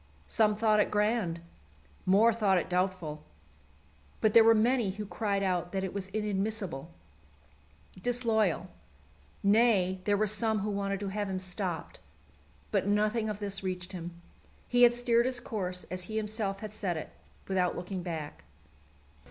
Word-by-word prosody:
Some 215 -2 +2
thought 215 0 +3
it - - +3
grand; 210 -5 0 0.7
more 215 +5 +5
thought 205 -4 +2
it 180 - -2
doubtful; 180 -4 -1 1.0
but 215 -1 +2
there 230 - +9
were 225 0 +6
many 235 0 +2
who 210 +2 -5
cried 200 +1 -1
out 180 -1 -1
that 190 -1 -1
it 190 - -3
was 195 -1 -3
inadmissible, 200 -6 -2 1.1
disloyal 225 -5 +1 0.8
nay, 200 -3 +3
there 205 -1 +2
were 215 - +2
some 220 +1 +1
who 210 +1 -2
wanted 200 -1 -2
to 200 - -2
have 205 0 -3
him 190 - -2
stopped. 185 -2 -4 0.7
But - - +1
nothing 215 +2 +1
of 210 - -3
this 200 -2 -2
reached 185 -1 -4
him. 170 -1 -7 0.5
He 245 0 +2
had 240 0 +7
steered 240 0 +2
his 255 -1 -1
course 185 -6 -3
as 185 0 -2
he 220 +2 -4
himself 210 -2 -1
had 215 -1 -6
set 185 -6 -2
it, 155 - -6 0.4
without 185 -2 +1
looking 180 +1 -4
back. 160 -4 -6
200 Hz, 155 wpm, -30 LUFS, 185-220 Hz, 1.1 s, there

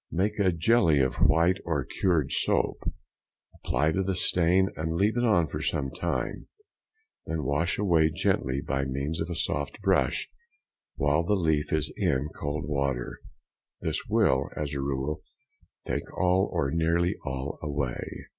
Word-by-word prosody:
Make 105 +5 0
a 95 -2 +4
jelly 85 -2 +3
of 65 -1 +1
white 85 +4 +3
or 75 -6 -1 0.2
curd 85 -7 +2
soap, - - 0 0.6
apply 75 +5 0
to 95 - 0
the 95 0 -1
stain, 90 +3 +3
and 80 +1 -2
leave 100 +6 +2
it 120 - +1
on 90 -8 +4
for - - -5
some 70 -2 -1
time, - - -3 0.8
then 80 -1 -2
wash 75 +6 0
away 85 -6 +3
gently 70 -4 0
by 65 0 -1
means 70 +4 -2
of 80 - -3
a 85 - -3
soft 70 -1 -2
brush 95 -1 +2 0.7
while 75 +2 +2
the 95 +5 +1
leaf 80 -5 +1
is 80 -2 0
in 65 +3 +1
cold 75 0 -3
water; 70 -4 -2 0.6
this - - -1
will, - - +3
as 75 -1 -3
a 70 - -2
rule, 70 +2 -2 0.6
take - - -3
all, 95 +2 +3
or 80 -6 0
nearly 85 +2 +2
all, 65 +2 -4
away. 70 -4 -4
80 Hz, 155 wpm, -28 LUFS, 70-90 Hz, 0.8 s, a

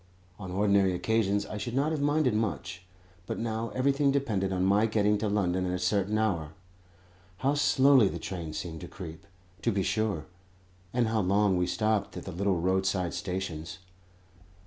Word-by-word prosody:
On 95 -2 -7
ordinary 100 0 +2
occasions 100 +1 +1
I 105 - -6
should 120 +4 -4
not 145 +3 +1
have 155 -3 -1
minded 145 -3 +2
much, 105 -4 -2 0.5
but - - -3
now 115 0 -2
everything 140 +2 +2
depended 110 -9 0
on 95 0 0
my 100 +3 +4
getting 105 -1 +2
to 105 0 -1
London 95 -3 +1
at 90 - -1
a - - -1
certain 100 +3 0
hour. 85 -8 -1 0.8
How 135 +8 +1
slowly 140 -4 +5
the 85 - -5
train 85 -2 -5
seemed 80 -2 -5
to - - -7
creep, 90 0 -9 0.3
to 115 - +1
be 100 -2 0
sure; 100 -4 -1 0.7
and 120 -1 +1
how 110 -1 +1
long 100 +1 +2
we 90 0 +1
stopped 105 +3 0
at - - -7
the - - -5
little 95 +1 0
roadside 95 0 0
stations! 90 -4 -4
100 Hz, 170 wpm, -29 LUFS, 90-110 Hz, 0.8 s, slowly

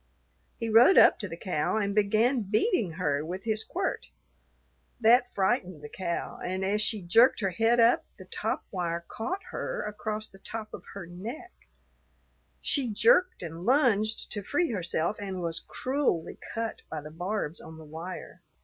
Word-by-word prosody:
He 230 - -3
rode 230 - +7
up - - +7
to 205 - -3
the 165 -2 -7
cow 180 +2 -1
and 200 -2 0
began 215 +5 +3
beating 210 - +1
her 150 -4 0
with 180 +4 -5
his 220 -1 0
quirt. 375 +2 -3 0.9
That 245 +2 +5
frightened 190 - 0
the 150 - -7
cow, 170 0 -4
and 185 +1 -2
as 210 +2 +1
she 215 -2 +1
jerked 230 +9 +5
her 195 -2 +1
head 225 +6 +2
up, 230 +1 +5
the - - -11
top - - -3
wire 170 -2 -2
caught 370 - -4
her - - -3
across 215 +1 -3
the 195 - -17
top 215 +2 -6
of - - -8
her 200 -3 -6
neck; 225 - -8 1.1
she 270 -5 +1
jerked 235 - +3
and 165 +1 -7
lunged 225 -3 +2
to 205 - -3
free 290 - 0
herself, 175 -1 -1
and 195 -2 -4
was 165 -1 -1
cruelly 260 - -2
cut 230 0 -3
by 155 - -4
the 150 +1 -9
barbs 175 0 -3
on 160 - -11
the 160 - -11
wire. 165 +4 -8
205 Hz, 165 wpm, -28 LUFS, 175-230 Hz, 1.1 s, rode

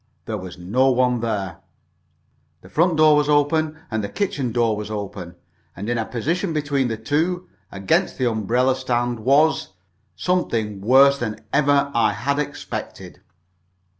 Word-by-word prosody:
There 110 - -3
was 95 -3 -8
no 115 +10 +1
one 125 -1 +2
there. 100 -6 -3 1.0
The 90 - -15
front 165 - +2
door 155 -1 +6
was 150 0 +2
open, 150 +2 +2
and 110 -2 -1
the 100 - -3
kitchen 180 - -2
door 115 -2 +1
was 105 0 -6
open, 100 -4 -6 0.4
and 100 +4 -6
in 120 0 0
a 110 - -1
position 165 - -2
between 145 -3 0
the 110 -2 -3
two, 160 +9 -1 0.2
against 95 -1 0
the 130 - +1
umbrella 120 +4 +1
stand, 120 -2 -1
was 140 0 +2 0.4
something 115 - -1
worse 135 +5 +5
than 110 -3 -4
ever 140 0 +3
I 110 -3 +2
had 140 +2 -1
expected. 145 -1 -6
125 Hz, 150 wpm, -22 LUFS, 110-145 Hz, 1.0 s, door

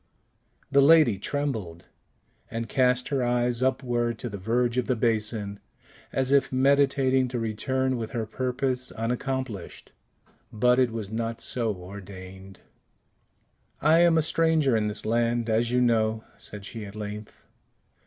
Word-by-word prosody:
The 140 0 +5
lady 140 -8 +6
trembled, 110 - -3 0.6
and 115 0 -4
cast 125 0 +1
her 140 -2 0
eyes 120 0 +1
upward 120 -3 0
to 120 - -5
the 100 - -6
verge 120 +4 0
of 125 - -2
the 130 - +1
basin, 110 -3 -1 0.5
as 130 0 0
if 140 -1 +3
meditating 135 -1 +3
to 125 -1 -3
return 130 +4 -1
with 110 -2 -4
her 115 -2 -3
purpose 130 +1 -2
unaccomplished. 125 -2 -4 0.6
But 125 +3 +3
it 125 -2 +3
was 110 -3 -5
not 115 0 -3
so 115 -2 -1
ordained. 95 0 -11 1.2
"I 160 +2 +4
am 170 -1 +5
a 160 - +3
stranger 160 -5 +2
in 105 -1 +1
this 105 0 -4
land, 115 +1 +1
as 115 +2 +2
you 125 +1 +2
know," 110 -2 +1 0.2
said 105 -1 -9
she 115 +1 -7
at 100 0 -9
length. 105 0 -8
120 Hz, 145 wpm, -26 LUFS, 110-130 Hz, 1.2 s, lady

